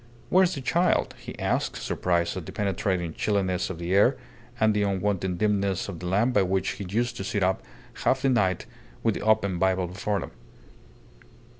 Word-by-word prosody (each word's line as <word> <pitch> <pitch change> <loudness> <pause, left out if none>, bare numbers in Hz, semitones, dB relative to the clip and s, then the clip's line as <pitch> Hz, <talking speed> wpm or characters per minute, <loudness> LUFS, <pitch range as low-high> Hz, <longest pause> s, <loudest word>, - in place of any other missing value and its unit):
"Where 185 +1 +5
is 185 - +1
the 140 - -5
child?" 170 +8 +2
he - - -9
asked, - - -1
surprised 85 -1 0
at 95 -4 -6
the - - -6
penetrating 95 -4 -1
chilliness 95 -3 0
of 95 - -5
the 85 +2 -2
air 105 +7 +5 0.4
and 110 0 +4
the 105 - +1
unwonted 95 -2 0
dimness 100 -2 +1
of 95 -5 -6
the 90 - -5
lamp 105 +7 +2
by 105 - +4
which 95 0 0
he 100 -1 -5
used 120 +4 -1
to - - -4
sit 105 0 -1
up 95 +1 +1 0.4
half 130 +1 +2
the 135 - +4
night 95 -8 +1 0.4
with 115 - +3
the - - -5
open 105 -4 +2
Bible 95 0 +2
before 100 +3 -2
him. - - -7
100 Hz, 190 wpm, -26 LUFS, 95-110 Hz, 0.4 s, Where